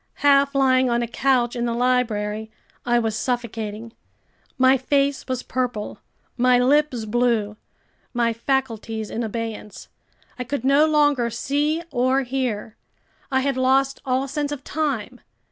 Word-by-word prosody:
Half 280 Hz, 0 st, +4 dB
lying 260 Hz, -1 st, +3 dB
on 240 Hz, 0 st, +1 dB
a -, -, -2 dB
couch 245 Hz, 0 st, +1 dB
in 240 Hz, 0 st, -1 dB
the 235 Hz, -1 st, -1 dB
library, 220 Hz, -4 st, 0 dB, 0.4 s
I 240 Hz, 0 st, +3 dB
was 225 Hz, -2 st, 0 dB
suffocating. 225 Hz, -2 st, -4 dB, 0.6 s
My 260 Hz, +1 st, +5 dB
face 275 Hz, +1 st, 0 dB
was 255 Hz, -2 st, -3 dB
purple, 245 Hz, -5 st, -3 dB, 0.4 s
my 250 Hz, 0 st, +4 dB
lips 255 Hz, -2 st, +2 dB
blue, 225 Hz, -2 st, 0 dB, 0.6 s
my 235 Hz, -1 st, +1 dB
faculties 230 Hz, -3 st, -2 dB
in 230 Hz, -, -3 dB
abeyance. 225 Hz, -2 st, -6 dB, 0.5 s
I -, -, -1 dB
could 255 Hz, 0 st, -4 dB
no 280 Hz, +3 st, +5 dB
longer 290 Hz, -6 st, +2 dB
see 290 Hz, +7 st, -1 dB
or 260 Hz, +1 st, +2 dB
hear. 245 Hz, -4 st, -3 dB, 0.6 s
I 265 Hz, 0 st, +2 dB
had 275 Hz, -1 st, -1 dB
lost 265 Hz, +1 st, +2 dB
all 260 Hz, +1 st, 0 dB
sense 290 Hz, +1 st, -3 dB
of 280 Hz, -2 st, -5 dB
time. 270 Hz, -6 st, -3 dB
250 Hz, 140 wpm, -22 LUFS, 230-270 Hz, 0.6 s, My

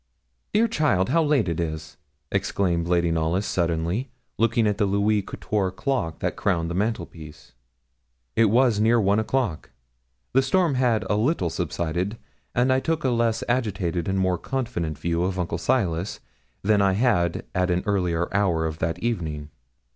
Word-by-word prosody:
'Dear 225 Hz, +2 st, +4 dB
child, 145 Hz, -, +1 dB
how 165 Hz, +5 st, +3 dB
late 145 Hz, -8 st, +2 dB
it 85 Hz, -1 st, -2 dB
is!' 80 Hz, -2 st, -4 dB, 0.4 s
exclaimed 85 Hz, -4 st, 0 dB
Lady 85 Hz, -1 st, +2 dB
Knollys 80 Hz, +5 st, 0 dB
suddenly, 85 Hz, +8 st, -1 dB, 0.3 s
looking 115 Hz, 0 st, +3 dB
at 105 Hz, 0 st, 0 dB
the 105 Hz, -, +3 dB
Louis 100 Hz, +2 st, +2 dB
Quatorze 95 Hz, -1 st, -2 dB
clock, 125 Hz, -, -2 dB
that -, -, -1 dB
crowned 85 Hz, -4 st, 0 dB
the -, -, -2 dB
mantelpiece. 85 Hz, -7 st, -4 dB, 0.8 s
It 115 Hz, -, +5 dB
was 115 Hz, 0 st, +3 dB
near 115 Hz, +2 st, +4 dB
one 100 Hz, 0 st, +3 dB
o'clock. 110 Hz, -, -1 dB, 0.6 s
The 135 Hz, -, +5 dB
storm 165 Hz, +4 st, +2 dB
had 125 Hz, -4 st, +2 dB
a -, -, +1 dB
little 110 Hz, -, +1 dB
subsided, 90 Hz, +8 st, -2 dB, 0.4 s
and 125 Hz, +2 st, +3 dB
I 130 Hz, -, +3 dB
took 165 Hz, +3 st, -1 dB
a 130 Hz, -, +2 dB
less 115 Hz, -1 st, +1 dB
agitated 95 Hz, -9 st, -1 dB
and 95 Hz, 0 st, 0 dB
more 95 Hz, -2 st, +1 dB
confident 85 Hz, -, -3 dB
view 85 Hz, +2 st, -1 dB
of 95 Hz, +1 st, -1 dB
Uncle 85 Hz, -2 st, -2 dB
Silas 90 Hz, -4 st, 0 dB, 0.4 s
than 105 Hz, 0 st, +3 dB
I 95 Hz, -1 st, +3 dB
had 95 Hz, -6 st, +1 dB
at 90 Hz, 0 st, +1 dB
an 90 Hz, 0 st, +1 dB
earlier 90 Hz, -5 st, 0 dB
hour 85 Hz, -5 st, +2 dB
of 80 Hz, 0 st, -4 dB
that 80 Hz, +1 st, -1 dB
evening. 80 Hz, -10 st, -3 dB
95 Hz, 160 wpm, -24 LUFS, 85-115 Hz, 0.8 s, It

